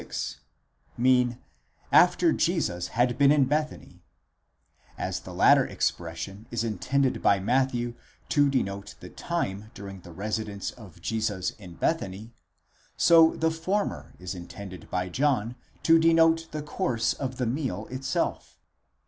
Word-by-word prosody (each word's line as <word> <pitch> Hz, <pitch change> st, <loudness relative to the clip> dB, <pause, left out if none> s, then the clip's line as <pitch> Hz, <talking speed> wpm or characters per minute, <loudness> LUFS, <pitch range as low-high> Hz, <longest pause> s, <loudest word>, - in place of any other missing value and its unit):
6) -, -, -5 dB, 0.6 s
mean: 125 Hz, -1 st, +3 dB, 0.5 s
after -, -, +5 dB
Jesus 90 Hz, 0 st, 0 dB
had 120 Hz, +1 st, +2 dB
been 140 Hz, 0 st, +6 dB
in 145 Hz, -2 st, +4 dB
Bethany: 150 Hz, +3 st, -3 dB, 1.0 s
as -, -, -3 dB
the -, -, -10 dB
latter -, -, +5 dB
expression 95 Hz, +6 st, -3 dB
is 115 Hz, -1 st, -2 dB
intended 125 Hz, +5 st, 0 dB
by 100 Hz, -, +4 dB
Matthew 120 Hz, +2 st, 0 dB, 0.4 s
to 145 Hz, -1 st, +4 dB
denote 100 Hz, -6 st, -2 dB
the -, -, -10 dB
time 110 Hz, -, -3 dB
during 100 Hz, -1 st, -9 dB
the 85 Hz, -, -12 dB
residence 105 Hz, +1 st, -3 dB
of 95 Hz, -8 st, -15 dB
Jesus 110 Hz, -4 st, -1 dB
in 90 Hz, -5 st, -13 dB
Bethany, 110 Hz, -, -2 dB, 0.6 s
so 165 Hz, -1 st, +6 dB
the 160 Hz, 0 st, +1 dB
former 185 Hz, +6 st, -2 dB
is 90 Hz, +1 st, -6 dB
intended 95 Hz, +1 st, -9 dB
by 90 Hz, 0 st, -1 dB
John 125 Hz, +1 st, 0 dB, 0.3 s
to 165 Hz, 0 st, +6 dB
denote 165 Hz, 0 st, +4 dB
the 150 Hz, -1 st, -4 dB
course 150 Hz, -6 st, 0 dB
of 130 Hz, -2 st, -5 dB
the 125 Hz, -, 0 dB
meal 130 Hz, +4 st, -2 dB
itself.! 130 Hz, 0 st, -2 dB
120 Hz, 130 wpm, -27 LUFS, 100-145 Hz, 1.0 s, been